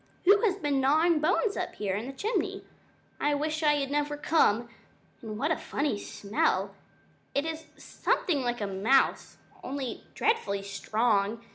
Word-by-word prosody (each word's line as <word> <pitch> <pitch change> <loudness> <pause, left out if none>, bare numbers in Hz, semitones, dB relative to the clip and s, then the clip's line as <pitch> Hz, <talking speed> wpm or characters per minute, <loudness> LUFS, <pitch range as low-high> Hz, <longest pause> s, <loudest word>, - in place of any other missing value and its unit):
"Who 400 +2 +6
has 410 -5 +2
been 290 -8 0
gnawing 315 +4 +3
bones 375 +7 +1
up 360 - -4
here 200 -2 -2
in 215 +5 -4
the - - -5
chimney? 430 - -2 0.5
I 295 0 +2
wish 310 +2 -2
I 300 -1 +4
had 280 -1 -2
never 295 0 -1
come! 240 -7 +2 0.5
And 215 -3 -6
what 290 +7 0
a - - +3
funny 280 -9 -2
smell? 200 -2 -1 0.6
It 280 +2 +1
is 320 0 -4
something 300 -7 -1
like 240 -4 -2
mouse, 210 +8 +1 0.3
only 265 -2 -4
dreadfully 415 - 0
strong. 210 +2 0
280 Hz, 150 wpm, -28 LUFS, 220-315 Hz, 0.6 s, Who